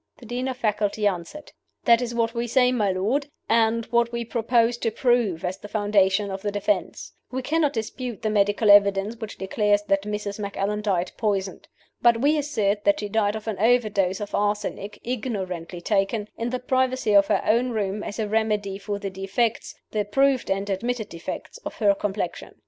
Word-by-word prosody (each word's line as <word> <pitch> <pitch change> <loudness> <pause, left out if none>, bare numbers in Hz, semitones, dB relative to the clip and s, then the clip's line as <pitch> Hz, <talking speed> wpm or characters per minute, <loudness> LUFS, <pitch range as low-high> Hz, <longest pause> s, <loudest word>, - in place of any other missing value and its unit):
The 245 - -14
Dean 245 +3 -3
of 260 -1 -3
Faculty 210 -2 0
answered: 195 - -3 0.3
"That 235 0 +6
is 240 -1 -3
what 230 -1 +1
we 235 0 -2
say, 250 +1 +3
my 210 -6 +1
lord, 225 +10 0 0.2
and 230 0 +2
what 235 0 +2
we 235 0 -3
propose 235 +1 +2
to 235 - 0
prove 225 -7 +1
as 185 +2 -3
the 210 - -9
foundation 205 -1 +2
of 190 0 -5
the 205 - -1
defense. 205 -1 -2 0.2
We 260 0 -4
cannot 300 0 +1
dispute 235 +1 -5
the 215 - +1
medical 205 +1 +3
evidence 200 +2 +4
which 220 -2 -7
declares 205 +1 +1
that 195 -1 +1
Mrs. 210 0 -4
Macallan 200 +1 -2
died 185 -4 0
poisoned. 195 -4 -2 0.3
But 235 -1 +5
we 290 +5 +3
assert 210 -9 0
that 200 0 +3
she 205 - -4
died 210 -1 +1
of 220 0 -7
an 215 -3 -3
overdose 210 -5 +2
of 205 -1 -6
arsenic, 205 0 -2
ignorantly 190 -8 -4
taken, 205 +2 0
in 230 +1 -3
the 255 - -1
privacy 255 -3 0
of 200 -1 +6
her - - +1
own 240 +3 +2
room, 210 -3 -2
as 205 - -6
a 220 -2 -1
remedy 210 -2 0
for 205 0 -3
the 200 -1 -5
defects 195 +5 -1 0.2
the 210 -1 0
proved 270 +5 +2
and 195 +1 -1
admitted 220 +3 -2
defects 170 - -7
of - - -7
her 205 -3 +3
complexion. 200 +1 -4
210 Hz, 190 wpm, -24 LUFS, 200-235 Hz, 0.3 s, That